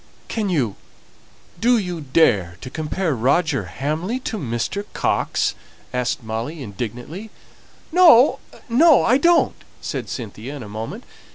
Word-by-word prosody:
"Can 215 Hz, -3 st, -2 dB
you 130 Hz, -, 0 dB, 0.8 s
do 240 Hz, +4 st, +4 dB
you 180 Hz, -6 st, -3 dB
dare 120 Hz, -, +2 dB
to 130 Hz, -, -8 dB
compare 160 Hz, +2 st, -2 dB
Roger 135 Hz, -, +1 dB
Hamley 155 Hz, -, -3 dB
to 220 Hz, -4 st, -4 dB
Mr. 120 Hz, -, -2 dB
Coxe?" -, -, 0 dB, 0.4 s
asked 125 Hz, -1 st, -1 dB
Molly, 115 Hz, +8 st, -4 dB
indignantly. 125 Hz, -, -6 dB, 0.6 s
"No, 320 Hz, -7 st, +7 dB, 0.3 s
no, 280 Hz, +5 st, +5 dB
I 255 Hz, +4 st, +4 dB
don't!" 340 Hz, +3 st, +3 dB, 0.2 s
said -, -, -5 dB
Cynthia 120 Hz, +3 st, -6 dB
in 135 Hz, -, -7 dB
a -, -, -9 dB
moment. 110 Hz, -, -6 dB
150 Hz, 125 wpm, -21 LUFS, -, 0.8 s, No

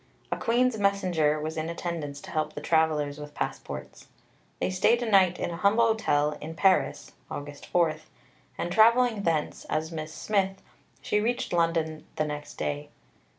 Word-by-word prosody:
A -, -, +1 dB
Queen's 240 Hz, 0 st, +1 dB
messenger 180 Hz, -7 st, +2 dB
was 155 Hz, +2 st, -4 dB
in 160 Hz, +1 st, -2 dB
attendance 165 Hz, -4 st, -4 dB
to -, -, -10 dB
help 155 Hz, -2 st, -1 dB
the -, -, -5 dB
travellers 155 Hz, -3 st, +1 dB
with 150 Hz, 0 st, -9 dB
passports. -, -, -5 dB, 0.5 s
They -, -, 0 dB
stayed 235 Hz, +6 st, +3 dB
a -, -, -1 dB
night 190 Hz, -4 st, +4 dB
in -, -, -2 dB
a 170 Hz, -, -5 dB
humble 210 Hz, +5 st, +4 dB
hotel 150 Hz, -10 st, +1 dB
in 160 Hz, +2 st, -6 dB
Paris 190 Hz, +2 st, +2 dB, 0.2 s
(August 145 Hz, 0 st, -7 dB
4), 165 Hz, -3 st, +2 dB, 0.6 s
and 175 Hz, -, -3 dB
travelling 230 Hz, +2 st, +5 dB
thence, 165 Hz, -5 st, -1 dB
as 155 Hz, +1 st, -1 dB
Miss 155 Hz, -1 st, -5 dB
Smith, 195 Hz, +1 st, -1 dB, 0.4 s
she 210 Hz, -, +1 dB
reached 240 Hz, -1 st, -1 dB
London 165 Hz, -2 st, 0 dB
next 150 Hz, -1 st, -3 dB
day. 145 Hz, 0 st, -3 dB
170 Hz, 155 wpm, -27 LUFS, 155-200 Hz, 0.6 s, travelling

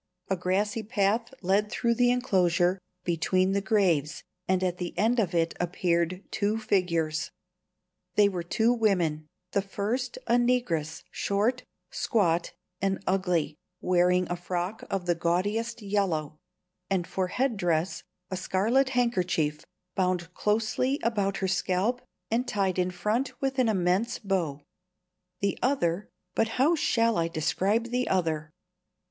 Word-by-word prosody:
A 190 Hz, -, +2 dB
grassy 195 Hz, +5 st, 0 dB
path 220 Hz, +1 st, 0 dB
led 200 Hz, +3 st, +2 dB
through 235 Hz, -1 st, +1 dB
the 245 Hz, +1 st, +3 dB
enclosure, 185 Hz, -7 st, +2 dB, 0.2 s
between 185 Hz, +2 st, +1 dB
the 200 Hz, 0 st, +1 dB
graves, 180 Hz, -8 st, +1 dB, 0.2 s
and 185 Hz, 0 st, +2 dB
at 180 Hz, -1 st, -1 dB
the 175 Hz, -1 st, -5 dB
end 235 Hz, +3 st, +3 dB
of 180 Hz, -6 st, 0 dB
it 165 Hz, 0 st, +2 dB
appeared 175 Hz, +1 st, 0 dB
two 210 Hz, +1 st, 0 dB
figures. 170 Hz, -7 st, 0 dB, 0.9 s
They 205 Hz, -1 st, +6 dB
were 185 Hz, -3 st, -2 dB
two 220 Hz, +7 st, +2 dB
women; 175 Hz, -10 st, +1 dB, 0.2 s
the 200 Hz, -, +2 dB
first 220 Hz, +6 st, -3 dB
a 240 Hz, -, +3 dB
negress, 240 Hz, -11 st, 0 dB
short, 215 Hz, +6 st, 0 dB, 0.3 s
squat, 175 Hz, -8 st, +1 dB, 0.3 s
and 195 Hz, 0 st, 0 dB
ugly, 180 Hz, -5 st, +1 dB, 0.3 s
wearing 180 Hz, 0 st, +3 dB
a 175 Hz, -, -2 dB
frock 180 Hz, +4 st, -3 dB
of 195 Hz, -2 st, -2 dB
the 175 Hz, -, +3 dB
gaudiest 205 Hz, +8 st, -1 dB
yellow, 180 Hz, -7 st, -1 dB, 0.5 s
and 190 Hz, -3 st, +1 dB
for 185 Hz, 0 st, -2 dB
head 250 Hz, +5 st, 0 dB
dress 175 Hz, -2 st, 0 dB, 0.3 s
a 185 Hz, -, -2 dB
scarlet 220 Hz, +9 st, +2 dB
handkerchief, 180 Hz, -10 st, +1 dB, 0.3 s
bound 180 Hz, -2 st, -1 dB
closely 225 Hz, +7 st, 0 dB
about 205 Hz, -4 st, 0 dB
her 190 Hz, -, -1 dB
scalp 190 Hz, +6 st, 0 dB, 0.3 s
and 240 Hz, +3 st, +1 dB
tied 190 Hz, -3 st, 0 dB
in 180 Hz, 0 st, +2 dB
front 225 Hz, +8 st, -2 dB
with 270 Hz, 0 st, -1 dB
an 245 Hz, -3 st, +4 dB
immense 195 Hz, +4 st, +1 dB
bow; 175 Hz, -9 st, -1 dB, 0.8 s
the 200 Hz, -1 st, 0 dB
other 205 Hz, -8 st, 0 dB, 0.2 s
but 225 Hz, -, +2 dB
how 280 Hz, +6 st, +4 dB
shall 230 Hz, -, +2 dB
I 165 Hz, -, +1 dB
describe 195 Hz, +8 st, 0 dB
the 250 Hz, +1 st, 0 dB
other? 160 Hz, -4 st, 0 dB
195 Hz, 140 wpm, -28 LUFS, 175-225 Hz, 0.9 s, They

